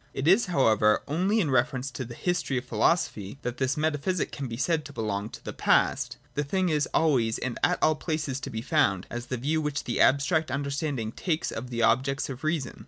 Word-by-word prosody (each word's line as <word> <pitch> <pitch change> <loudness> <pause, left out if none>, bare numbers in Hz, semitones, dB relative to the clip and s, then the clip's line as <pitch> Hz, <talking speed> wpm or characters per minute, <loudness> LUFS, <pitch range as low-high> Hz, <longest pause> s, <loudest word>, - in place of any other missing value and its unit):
It 135 - -2
is 195 +6 +5
hovirever 110 -9 +3
only 185 +9 +1
in 160 -9 +1
reference 130 +1 +1
to 125 +2 -5
the 120 -1 -9
history 175 -6 -1
of 125 - -3
philosophy 110 - 0
that 125 0 -3
this 130 +1 0
Metaphysic 155 +3 0
can 140 -2 -5
be 115 -1 -5
said 160 +3 +1
to 145 - -10
belong 105 -3 -2
to - - -12
the - - -5
past: - - +1 0.2
the 145 - -1
thing 185 +5 0
is 150 -2 +1
always 125 -8 +2
and 130 -2 -4
at 180 - +3
all 155 - +5
places 150 -4 -3
to - - -6
be 110 0 -5
found, 120 - +2
as 120 0 -5
the 130 - -3
view 150 +6 0
which 150 -2 -2
the 120 - -1
abstract 155 +3 +3
understanding 140 -3 -2
takes 165 +5 -2
of 125 +3 -6
the 115 -1 -1
ob 120 +3 +4
jects 135 +1 -2
of 130 +2 -9
reason. 155 -5 -2
140 Hz, 220 wpm, -27 LUFS, 120-155 Hz, 0.2 s, is